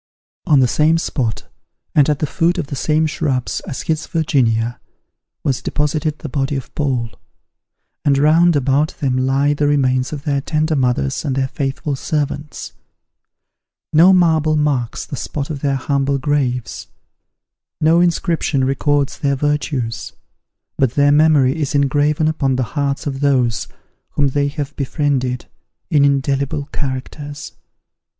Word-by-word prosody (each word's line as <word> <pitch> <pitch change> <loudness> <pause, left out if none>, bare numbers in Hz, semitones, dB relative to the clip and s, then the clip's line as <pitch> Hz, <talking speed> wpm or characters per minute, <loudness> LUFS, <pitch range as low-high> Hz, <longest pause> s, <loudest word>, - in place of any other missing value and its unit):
On 145 -4 +5
the 125 - +4
same 155 +6 +3
spot, 130 -8 -2 0.5
and 145 -1 +4
at 150 - +2
the 150 - -1
foot 170 +5 0
of 175 - -1
the - - -2
same 155 +4 +1
shrubs 150 -5 -1
as 130 - -5
his 160 -1 -2
Virginia, 120 -8 0 0.6
was 130 -3 0
deposited 150 +1 -1
the - - -7
body 140 +1 -1
of 135 - -6
Paul; 130 -6 -1 0.9
and 140 -2 +3
round 160 +4 +4
about 140 +2 +1
them 130 -3 0
lie 135 +3 +2
the 145 0 0
remains 130 -3 +1
of 145 -2 -6
their 140 -3 0
tender 155 +2 0
mothers 125 - 0
and 140 -4 -1
their 135 -1 0
faithful 140 +1 -3
servants. 150 +1 -3 1.2
No 170 +5 +7
marble 160 -4 +3
marks 140 -6 -1
the - - -6
spot 140 +2 -4
of 145 - -4
their 140 -1 0
humble 140 +1 0
graves, 130 -4 -2 0.9
no 160 +2 +4
inscription 165 -5 +1
records 140 +1 0
their 140 -1 +1
virtues; 140 -4 -2 0.7
but 130 -3 +2
their 145 0 +4
memory 150 -1 +4
is 145 0 -1
engraven 145 +2 +2
upon 140 -4 0
the 130 - 0
hearts 140 -2 -1
of 135 -2 -3
those 125 -6 +1 0.5
whom 145 -2 +2
they 140 +1 0
have 145 0 -5
befriended, 135 -3 -1 0.5
in 145 -3 +4
indelible 140 +1 0
characters. 145 +2 -5
145 Hz, 145 wpm, -18 LUFS, 135-150 Hz, 1.2 s, No